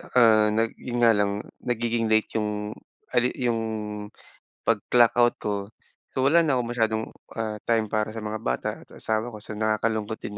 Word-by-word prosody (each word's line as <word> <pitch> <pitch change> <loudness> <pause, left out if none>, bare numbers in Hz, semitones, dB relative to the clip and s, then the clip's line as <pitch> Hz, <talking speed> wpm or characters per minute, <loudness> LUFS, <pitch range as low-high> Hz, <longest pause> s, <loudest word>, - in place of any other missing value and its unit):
tsaka - - -2 0.4
nag 115 0 +1
'yon 120 -1 -4
nga 115 - +7
lang, 100 0 0 0.2
nagiging 120 -1 0
late 110 0 +2
yung 105 0 -3 0.4
a - - -3
late 125 - 0
yung, 120 -3 0 1.1
pag 115 -3 +2
clock 120 -2 +5
out 120 0 +4
ko. 105 - -2 0.6
So, 130 - +1
wala 165 +5 +6
na 150 -5 +2
akong 120 -1 -2
masyadong, 110 -1 +1 0.3
ah, 110 -2 -3
time 115 0 +1
para 110 0 +1
sa 110 0 -6
mga 110 +1 -3
bata 65 - -1
at - - -18
asawa 110 +2 -2
ko. 105 - -7
So, 105 +1 -6
nakakalungkot 110 0 0
din 105 0 -6
110 Hz, 185 wpm, -26 LUFS, 105-120 Hz, 1.1 s, nga